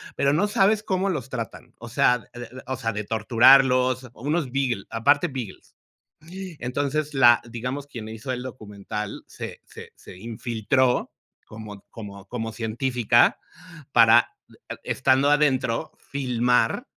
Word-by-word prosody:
pero 140 Hz, 0 st, +2 dB
no 195 Hz, +7 st, +2 dB
sabes 210 Hz, +1 st, +2 dB
cómo 190 Hz, -1 st, 0 dB
los 160 Hz, -7 st, -3 dB
tratan. 115 Hz, -4 st, -7 dB
O 120 Hz, -, -9 dB
sea, 125 Hz, +1 st, +3 dB
de -, -, -20 dB
de 125 Hz, +2 st, -10 dB
o 130 Hz, -, -2 dB
sea, 115 Hz, -3 st, -2 dB
de 105 Hz, +1 st, -3 dB
torturarlos. 125 Hz, +3 st, +4 dB
Unos 145 Hz, +2 st, -2 dB
Beagle, 125 Hz, -7 st, -1 dB
aparte 145 Hz, +8 st, +2 dB
Beagles. 130 Hz, -, -8 dB, 0.6 s
Entonces, 150 Hz, -4 st, -3 dB
la 120 Hz, -4 st, +6 dB
digamos, 125 Hz, +4 st, -5 dB
quien 115 Hz, -6 st, -8 dB
hizo 110 Hz, +4 st, -6 dB
el 125 Hz, -1 st, -3 dB
documental 105 Hz, -4 st, -7 dB
se -, -, -8 dB
se -, -, -12 dB
se -, -, -13 dB
infiltró 120 Hz, +4 st, 0 dB, 0.3 s
como 110 Hz, -2 st, -10 dB
como 100 Hz, -3 st, -10 dB
como 115 Hz, 0 st, -4 dB
científica 120 Hz, +1 st, +2 dB, 0.5 s
para 115 Hz, 0 st, +6 dB, 0.5 s
estando 135 Hz, +2 st, +2 dB
adentro 135 Hz, -5 st, +1 dB
filmar 125 Hz, -4 st, 0 dB
125 Hz, 130 wpm, -24 LUFS, 115-140 Hz, 0.6 s, la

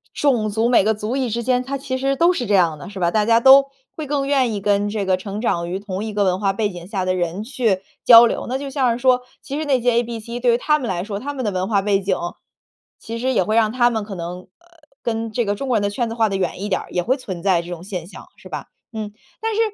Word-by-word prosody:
种 240 Hz, -7 st, +1 dB
族、 220 Hz, +3 st, +1 dB
每 245 Hz, -5 st, +4 dB
个 220 Hz, +2 st, +2 dB
族 215 Hz, +4 st, -3 dB
裔 260 Hz, -3 st, -1 dB
之 235 Hz, +2 st, -2 dB
间， 250 Hz, 0 st, +1 dB
它 275 Hz, +2 st, -4 dB
其 265 Hz, -1 st, -4 dB
实 275 Hz, +1 st, +1 dB
都 340 Hz, +5 st, +4 dB
是 245 Hz, -9 st, -3 dB
这 205 Hz, -, +3 dB
样 165 Hz, -5 st, +2 dB
的， 145 Hz, -, -9 dB
是 200 Hz, -2 st, -8 dB
吧？ 170 Hz, -1 st, +1 dB
大 215 Hz, -1 st, +2 dB
家 230 Hz, 0 st, +5 dB
都 270 Hz, +3 st, +7 dB, 0.3 s
会 310 Hz, -2 st, -5 dB
更 280 Hz, -1 st, -1 dB
愿 270 Hz, -4 st, +2 dB
意 205 Hz, -, -2 dB
跟 205 Hz, 0 st, +1 dB
这 205 Hz, -2 st, -2 dB
个 185 Hz, -1 st, +2 dB
成 200 Hz, +2 st, -6 dB
长 170 Hz, -7 st, -1 dB
于 185 Hz, +2 st, -3 dB
同 200 Hz, -1 st, -5 dB
一 220 Hz, -, -4 dB
个 205 Hz, -1 st, +1 dB
文 185 Hz, -1 st, +1 dB
化 195 Hz, -1 st, +1 dB
背 205 Hz, +2 st, -1 dB
景 175 Hz, -1 st, -9 dB
下 190 Hz, -3 st, -2 dB
的 185 Hz, -, +1 dB
人 180 Hz, +2 st, -2 dB
去 225 Hz, -6 st, 0 dB, 0.2 s
交 235 Hz, 0 st, +9 dB
流。 235 Hz, -, -2 dB
那 260 Hz, -, -1 dB
就 280 Hz, +1 st, -6 dB
像 260 Hz, -3 st, +2 dB
是 -, -, -4 dB
说 250 Hz, 0 st, +3 dB, 0.2 s
其 280 Hz, +2 st, -4 dB
实 315 Hz, -, -3 dB
那 270 Hz, -3 st, +2 dB
些 245 Hz, +1 st, +2 dB
ABC 235 Hz, 0 st, -2 dB
对 245 Hz, 0 st, +3 dB
于 -, -, +3 dB
他 300 Hz, +4 st, +2 dB
们 250 Hz, -, -4 dB
来 175 Hz, -2 st, -2 dB
说， 200 Hz, -1 st, -5 dB
他 285 Hz, +6 st, -4 dB
们 255 Hz, -, -3 dB
的 210 Hz, -, 0 dB
文 185 Hz, 0 st, -2 dB
化 200 Hz, -3 st, +1 dB
背 200 Hz, -1 st, +2 dB
景， 190 Hz, -1 st, 0 dB, 0.8 s
其 230 Hz, +1 st, -7 dB
实 260 Hz, +2 st, 0 dB
也 190 Hz, -, +3 dB
会 215 Hz, +4 st, -1 dB
让 220 Hz, -2 st, +3 dB
他 240 Hz, 0 st, +3 dB
们 220 Hz, -2 st, -2 dB
可 205 Hz, -1 st, -7 dB
能 175 Hz, +1 st, -5 dB
呃， 185 Hz, -, -17 dB, 0.6 s
跟 225 Hz, -1 st, -2 dB
这 235 Hz, +1 st, -1 dB
个 205 Hz, -, 0 dB
中 270 Hz, +6 st, -5 dB
国 245 Hz, -, +2 dB
人 205 Hz, -, -1 dB
的 200 Hz, -, 0 dB
圈 235 Hz, +1 st, -2 dB
子 225 Hz, -, -5 dB
划 225 Hz, -2 st, +2 dB
得 195 Hz, -, -2 dB
远 180 Hz, -2 st, -2 dB
一 205 Hz, -, -3 dB
点 185 Hz, -, 0 dB
儿， -, -, -12 dB
也 180 Hz, -, -1 dB
会 260 Hz, +8 st, +1 dB
存 185 Hz, -9 st, -7 dB
在 185 Hz, -4 st, +3 dB
这 170 Hz, -, -12 dB
种 175 Hz, -1 st, -7 dB
现 180 Hz, -4 st, -6 dB
象， -, -, -12 dB
是 -, -, -14 dB
吧？ -, -, -6 dB, 0.3 s
嗯， 210 Hz, -1 st, -4 dB, 0.3 s
但 450 Hz, 0 st, -1 dB
是 430 Hz, -, -1 dB
220 Hz, 325 characters per minute, -21 LUFS, 195-250 Hz, 0.8 s, 交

